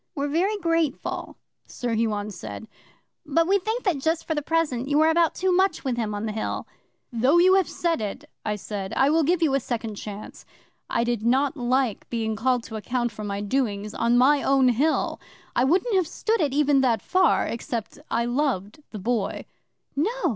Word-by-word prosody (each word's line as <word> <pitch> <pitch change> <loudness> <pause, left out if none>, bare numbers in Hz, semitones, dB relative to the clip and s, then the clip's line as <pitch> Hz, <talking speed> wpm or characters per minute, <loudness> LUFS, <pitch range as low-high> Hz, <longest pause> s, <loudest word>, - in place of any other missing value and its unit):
'"We're 285 0 -1
very 375 +8 +1
grateful," 330 -6 -1 0.3
Sir 240 -2 -3
Huon 215 -2 -1
said, 110 - -8 0.6
"but 330 +3 +1
we 400 +2 +3
think 440 +6 -3
that 360 -9 +1
just 320 +4 0
for 320 - -1
the 295 - -1
present 290 -5 0
you 290 +1 +2
are 320 +1 +5
about 335 0 +2
too 375 0 +1
much 370 -1 +2
with 260 -3 -1
him 220 -3 -2
on 205 +2 -3
the 215 - -2
Hill." 215 +1 -3 0.5
'"Though 255 +8 +3
you 365 +2 +6
have 385 -3 +3
said 335 -7 -1
it," 215 +8 -5 0.2
I 210 -1 -1
said, 200 -1 -5
"I 270 +2 +3
will 325 +1 +4
give 340 +3 +2
you 295 -4 +2
a 275 - +3
second 230 -3 -4
chance." 205 0 -8 0.5
I 235 - +1
did 235 -2 -1
not 265 +6 +2
like 250 -3 0
being 220 -2 -1
called 250 +2 +1
to 220 -1 -7
account 240 +2 -2
for 215 0 -8
my 200 -1 -3
doings 210 -2 -1
on 235 +1 +2
my 275 +3 +5
own 270 -2 +4
Hill. 285 +7 +1 0.3
I 245 - +3
wouldn't 370 - +2
have 370 -4 +2
stood 445 +4 -1
it 290 -3 +1
even 285 -1 +3
that 240 -4 +1
far 370 0 +3
except 230 -1 -4
I 235 +1 0
loved 240 -3 -1
the 215 - -7
Boy. 220 +1 -2 0.5
'"No! 305 +9 +1
260 Hz, 200 wpm, -25 LUFS, 225-320 Hz, 0.6 s, you